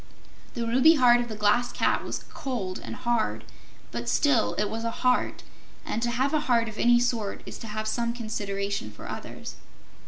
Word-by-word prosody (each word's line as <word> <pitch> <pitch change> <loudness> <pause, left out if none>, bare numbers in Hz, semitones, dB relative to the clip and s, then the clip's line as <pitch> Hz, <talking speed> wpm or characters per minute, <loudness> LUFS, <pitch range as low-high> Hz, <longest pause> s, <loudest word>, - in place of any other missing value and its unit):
The 235 -2 -2
ruby 260 +8 +6
heart 245 -3 +6
of 240 - -2
the 215 - -5
Glass 210 +4 +2
Cat - - +1
was - - -5
cold 235 -10 -3
and - - -6
hard, 220 - 0 0.5
but 120 0 -3
still 285 -6 +3
it 210 - +1
was 225 +2 -4
a 230 - 0
heart, 250 +2 0 0.4
and 225 - -2
to 240 - +1
have 260 +4 0
a 310 - +3
heart 230 -2 +4
of 220 -1 -7
any 240 0 +5
sort 235 -4 -1
is - - -8
to 225 - -7
have 215 0 -3
some 235 +1 0
consideration 200 - -3
for 105 - -11
others. - - -7
230 Hz, 190 wpm, -27 LUFS, 210-245 Hz, 0.5 s, ruby